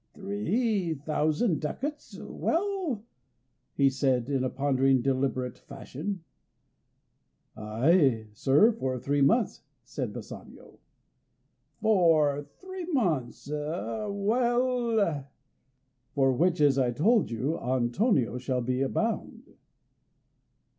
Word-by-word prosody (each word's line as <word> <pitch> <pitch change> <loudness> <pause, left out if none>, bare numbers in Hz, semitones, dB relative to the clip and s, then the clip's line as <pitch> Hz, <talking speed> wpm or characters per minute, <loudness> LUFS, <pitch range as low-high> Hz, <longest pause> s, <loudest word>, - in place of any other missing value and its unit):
"Three 205 -2 -1
thousand 155 - 0
ducats; 285 - -5
well?" 345 - -2 0.7
he 140 - +4
said 130 -1 0
in 135 -2 +1
a 130 - 0
pondering, 135 -2 +2
deliberate 130 -2 -1
fashion. 150 +7 -6 1.3
"Ay, 115 +2 +2
sir, 145 - +4
for 130 - -3
three 140 +3 0
months," 220 - +2 0.2
said - - -4
Bassanio. - - -11 1.0
"For 160 -9 +3
three 375 -2 -7
months; 165 - -1
well?" 210 - 0 0.9
"For 135 -2 +3
the - - -1
which, 175 +3 +2
as 140 -2 +4
I 125 -2 +2
told 200 - +2
you, 130 +8 -2
Antonio 125 - +1
shall 125 0 -1
be 130 +2 0
bound." 225 +10 -3
150 Hz, 95 wpm, -28 LUFS, 130-215 Hz, 1.3 s, he